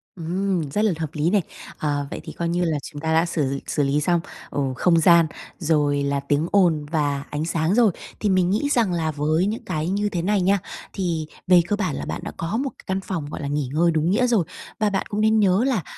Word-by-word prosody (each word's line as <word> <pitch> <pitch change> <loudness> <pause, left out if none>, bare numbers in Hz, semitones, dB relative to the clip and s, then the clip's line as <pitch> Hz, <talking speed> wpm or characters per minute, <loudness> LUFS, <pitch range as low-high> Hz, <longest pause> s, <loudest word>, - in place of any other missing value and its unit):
Ừm, 180 -1 -1
rất 210 - 0
là 215 - +3
hợp 160 -2 -2
lý 155 +2 +1
này! 200 +1 +3 0.4
Ờ, 145 -2 -1
vậy - - -5
thì - - -8
coi 170 -1 -2
như 175 +1 +1
là 160 -3 0
chúng 145 -2 -8
ta 160 +1 0
đã 165 +1 +4
xử 140 -5 -1
xử 150 - 0
lý 140 +2 +1
xong, 175 +3 +2 0.3
ồ, 135 -2 -1
không 170 +4 +3
gian, 170 0 +6 0.3
rồi 150 -3 +1
là 140 0 0
tiếng 145 +3 0
ồn 170 -7 +3
và 145 -3 0
ánh 150 +1 -2
sáng 165 +1 0
rồi, 230 -4 +5 0.3
thì 210 - 0
mình 185 -2 +3
nghĩ 215 +9 +1
rằng 225 -9 +2
là 160 -2 0
với 155 +4 +1
những 215 +3 -3
cái 155 +2 -2
như 205 +2 0
thế 175 -4 -2
này 200 +2 +1
nha, 195 +2 +3 0.3
thì 170 -5 -2 0.2
về 180 -1 +7
cơ 205 - +1
bản 185 -8 -2
là - - -4
bạn - - -4
đã - - -5
có 165 +7 -2
một 270 +2 -1
cái - - -17
căn 190 0 0
phòng, 185 -6 -4
gọi - - -6
là, 140 - -3
nghỉ 145 -2 -1
ngơi 170 +2 +3
đúng 160 +1 +1
nghĩa 245 +6 +3
rồi. 225 -8 +2 0.3
Và 215 -1 +2
bạn 195 -1 -1
cũng 210 +1 -1
nên 220 0 +4
nhớ 195 +1 +3
là 230 -10 0
170 Hz, 250 wpm, -23 LUFS, 150-195 Hz, 0.4 s, về